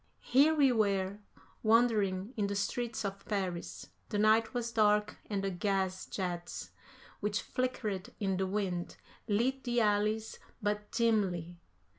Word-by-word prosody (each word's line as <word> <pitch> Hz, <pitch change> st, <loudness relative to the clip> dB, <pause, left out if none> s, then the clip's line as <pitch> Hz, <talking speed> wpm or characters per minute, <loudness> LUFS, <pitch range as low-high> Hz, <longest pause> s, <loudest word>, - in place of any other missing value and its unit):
Here 285 Hz, +5 st, +5 dB
we 280 Hz, -4 st, +5 dB
were, 200 Hz, -3 st, +1 dB, 0.4 s
wandering 215 Hz, -2 st, +3 dB
in 205 Hz, -3 st, 0 dB
the 200 Hz, -, -2 dB
streets 225 Hz, +2 st, -2 dB
of 195 Hz, 0 st, -4 dB
Paris; 185 Hz, -4 st, -3 dB, 0.2 s
the 210 Hz, -, -1 dB
night 220 Hz, +1 st, +4 dB
was 240 Hz, -2 st, -2 dB
dark 210 Hz, -2 st, +2 dB
and 200 Hz, -2 st, -1 dB
the 195 Hz, -, 0 dB
gas 190 Hz, 0 st, -1 dB
jets, 175 Hz, -2 st, -4 dB, 0.5 s
which 210 Hz, +1 st, -1 dB
flickered 220 Hz, -7 st, -2 dB
in 195 Hz, -2 st, 0 dB
the 190 Hz, 0 st, 0 dB
wind, 185 Hz, -3 st, -2 dB, 0.3 s
lit 245 Hz, +5 st, +1 dB
the 240 Hz, -1 st, +1 dB
alleys 215 Hz, +1 st, +1 dB, 0.2 s
but 210 Hz, 0 st, -2 dB
dimly. 190 Hz, -7 st, +1 dB
210 Hz, 135 wpm, -32 LUFS, 195-225 Hz, 0.5 s, Here